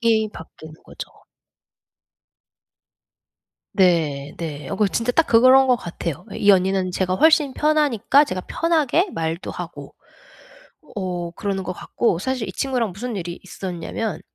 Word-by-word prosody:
이 220 -2 +2
바뀌는 160 -1 -12
거죠. - - -8 2.7
네 155 -7 +1
네. 150 -4 -6
어 - - -4
그 210 -2 +2
진짜 230 +5 -1
딱 330 - +3
그거 240 +3 +6
런 265 0 +6
것 250 -1 +4
같아요. 170 - -6
예 - - -6
이 205 - +5
언니는 190 -1 +2
제가 185 0 0
훨씬 305 - +4
편하니까 295 -3 +3
제가 185 -8 -4
편하게 330 +2 +1
말도 165 +2 -3
하고 - - -8 1.0
어 180 -3 -3
그러는 195 +1 -3
것 185 - -3
같고 180 0 -1
사실 255 +1 -2
이 - - -6
친구랑 245 -7 -1
무슨 230 +3 -5
일이 175 -1 -5
있었냐면 185 0 -5
200 Hz, 265 characters per minute, -22 LUFS, 175-255 Hz, 2.7 s, 그거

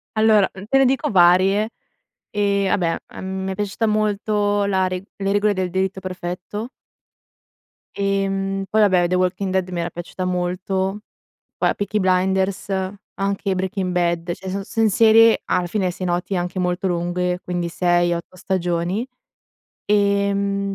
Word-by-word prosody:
Allora, 215 -2 +4 0.2
te 270 - +4
ne 270 - +5
dico 260 0 +1
varie: 190 +3 +4 0.6
ehm, 200 -1 +1
vabbè, 170 -3 +1
a - - -11
m 190 0 -4
mi 190 - -2
è - - -4
piaciuta 205 +3 -1
molto 210 -1 +1
la 190 -2 +1
re 185 0 -4
le 195 0 -1
regole 205 0 +2
del 185 -1 -2
delitto 190 +1 -1
perfetto. 185 +4 -5 1.3
Ehm, 195 0 -1
poi 220 - +3
vabbè, 185 -4 +4
The 180 - 0
Walking 185 +1 0
Dead 185 -1 0
mi 180 -1 -3
era 170 - -2
piaciuta 175 +2 -6
molto. 185 +2 -1 0.6
Poi, - - +2
uhm, - - -1
Peaky 205 +1 -1
Blinders, 190 +1 +1 0.5
anche 195 0 -1
Breaking 185 0 -2
Bad, 170 -1 0
cioè 190 +2 -8
son 195 +1 -3
son 225 +2 +1
serie, 225 +2 +6
alla 180 -1 0
finem 190 0 0
se 180 +1 -6
noti, 180 +2 -1
anche 180 +1 -2
molto 180 +1 -1
lunghe, 180 0 -1
quindi 175 -1 -2
6-8 175 0 0
stagioni, 180 +4 -1 0.8
ehm, 200 -1 +1
190 Hz, 150 wpm, -21 LUFS, 180-200 Hz, 1.3 s, serie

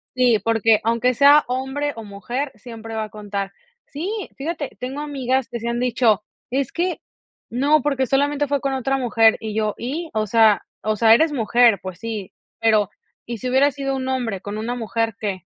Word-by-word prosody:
sí, 245 -4 +4
porque, 225 -1 +3
aunque 235 +2 +2
sea 285 +4 +6
hombre 265 +3 -2
o 225 - -7
mujer, 240 +8 -4
siempre 225 -2 -9
va 220 -1 -1
a - - -12
contar. 200 -1 -5 0.3
Sí, 385 +7 -5
fíjate, 300 0 -4
tengo 265 +4 -4
amigas 265 -3 -1
que 235 - -5
sí 235 - -5
han 235 0 -1
dicho: 235 -4 +2 0.3
"Es 270 -1 -1
que 355 +1 -2 0.5
no, 285 +5 +3
porque 275 -2 0
solamente 285 +2 +1
fue 285 -2 0
con 275 -1 -1
otra 270 +1 0
mujer", 230 -3 +4
y 215 -1 -5
yo: 215 -1 0
"¿y?", 310 +7 -4
o 215 -1 0
sea 220 -2 +4 0.2
o 215 +1 0
sea, 225 +1 +6
eres 310 +5 +3
mujer, 235 -3 +4
pues 185 -1 -7
sí, 220 -4 -5 0.3
pero 215 -3 +3 0.4
¿y 235 -2 -5
si 255 - -3
hubiera 270 +3 +4
sido 275 -1 -3
un 260 0 -4
hombre 240 -7 -2
con 205 +2 -6
una 235 +3 -3
mujer 225 -1 -1
que? 195 -4 -3
240 Hz, 195 wpm, -21 LUFS, 220-275 Hz, 0.5 s, sea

